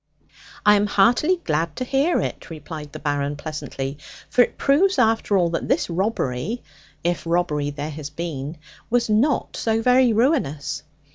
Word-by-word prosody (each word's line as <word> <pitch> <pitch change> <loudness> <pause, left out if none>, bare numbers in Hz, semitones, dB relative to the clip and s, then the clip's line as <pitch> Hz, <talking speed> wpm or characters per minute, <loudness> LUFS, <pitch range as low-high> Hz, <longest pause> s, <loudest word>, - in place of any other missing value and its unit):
'I 210 0 +7
am 205 +1 +1
heartily 245 - +3
glad 160 0 -1
to - - -3
hear 275 +7 +1
it,' - - -5
replied 155 -1 -8
the - - -7
Baron 145 -1 -1
pleasantly; 145 -2 -5 0.3
'for 250 - +5
it - - +1
proves 370 +8 +3
after 220 -2 +3
all 175 -2 +2
that 165 - -2
this - - +1
robbery 190 - -2 0.4
(if 175 +1 0
robbery 160 -4 0
there 145 +1 -5
has 150 -1 -6
been) 155 -1 -5 0.3
was 235 -2 +1
not 250 +7 +1
so 225 -1 0
very 250 0 +5
ruinous. 155 - 0
175 Hz, 155 wpm, -23 LUFS, 150-235 Hz, 0.4 s, I